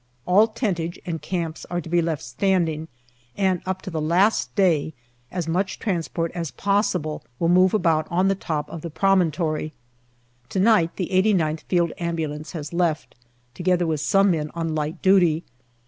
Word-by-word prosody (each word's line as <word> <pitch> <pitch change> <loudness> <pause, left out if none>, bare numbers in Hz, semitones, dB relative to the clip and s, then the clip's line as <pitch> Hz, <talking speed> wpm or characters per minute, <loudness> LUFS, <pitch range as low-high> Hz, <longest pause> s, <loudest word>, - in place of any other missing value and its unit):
All 205 +5 +5
tentage 190 -7 -2
and 165 -4 -4
camps 165 -1 -3
are 175 - -1
to 170 - -8
be 170 +1 +2
left 165 -3 -2
standing, 160 +3 0 0.5
and 190 -3 +1
up 190 0 -3
to 190 - -6
the 160 -2 -2
last 180 +8 +2
day 160 -6 +2 0.4
as 180 -3 -3
much 185 +4 -1
transport 170 -4 -2
as 170 -3 -4
possible 200 -6 -1
will 170 - +1
move 185 +1 +5
about 165 -6 +2
on 185 +2 +2
the 195 - +3
top 155 -6 -3
of 165 - -6
the 170 - -5
promontory. 160 -3 +1 0.8
To 190 - -2
night 195 -5 +3
the 180 - -3
8gth 185 -5 +2
Field 175 -2 +2
Ambulance 160 -2 -3
has 155 -1 -6
left, 170 -3 0 0.4
together 180 +2 +1
with 155 -3 -1
some 195 +4 +3
men 155 -3 -1
on 165 -1 -2
light 155 0 -3
duty. 175 -4 +4
170 Hz, 165 wpm, -23 LUFS, 160-190 Hz, 0.8 s, All